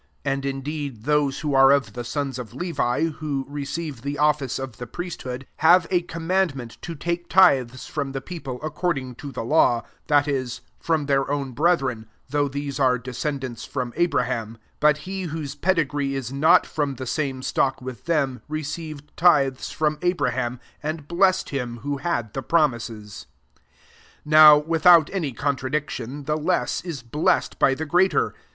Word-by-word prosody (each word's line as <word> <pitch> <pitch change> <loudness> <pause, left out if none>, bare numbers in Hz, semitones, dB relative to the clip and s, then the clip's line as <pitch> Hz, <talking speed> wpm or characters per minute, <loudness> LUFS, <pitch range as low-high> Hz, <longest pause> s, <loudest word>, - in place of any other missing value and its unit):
5 140 - +1
And 135 0 -4
indeed 140 0 -4
j - - -18
those 145 +1 +1
who 150 -2 -1
are 135 0 +7
of 135 -7 +2
the 120 - -5
sons 135 0 -3
of 120 -1 -8
Levi, 160 -5 -1
who 150 -4 -2
receive 145 -1 -5
the 140 +2 -4
office 150 -3 +1
of 130 -4 -6
the 125 - -7
priesthood, 135 -4 -6
have 170 +2 +5
a 180 -2 +3
com 165 -1 -8
mandment 160 -11 -1
to 170 - -6
take 170 +3 -3
tithes 130 -9 +4
from 145 -2 -3
the 135 - -3
people 135 -4 -7
according 150 -5 -2
to 140 +3 -8
the 125 - -5
law, 120 -3 +3 0.2
that 145 -1 +3
is, 130 -4 -2 0.2
from 160 -3 0
their 140 -1 +1
own 140 -2 -2
brethren, 135 -6 +1 0.2
though 145 +1 +1
these 140 0 -4
are 130 -2 +3
descendants 130 0 -4
from 125 -3 -4
Abraham: 115 -10 0
6 - - -25 0.2
but 150 -1 +4
he 190 0 -4
whose 155 -4 -4
pedigree 145 -6 0
is 130 -1 -4
not 155 +4 +5
from 145 -3 -2
the 130 - -6
9ame 135 -1 -2
stock 135 0 0
with 130 -1 -8
them, 140 -6 0
received 155 -1 -6
tithes 140 -7 +3
from 150 -1 -1
Abraham, 130 -9 0 0.2
and 155 -1 -4
blessed 185 +3 +2
him 125 -4 -3
who 145 0 -2
had 120 -9 -2
the 135 - -3
promises. 120 - -1 0.3
7 - - -35 0.7
Now, 155 -1 +10
without 165 +1 +5
any 165 -8 -1
contra 135 0 -2
diction, 145 -2 -3
the 150 +2 -1
less 170 +4 0
is 160 -9 -6
blessed 145 +7 0
by 135 - +4
the 160 - -4
greater. 175 +1 +2
140 Hz, 170 wpm, -24 LUFS, 130-155 Hz, 0.7 s, Now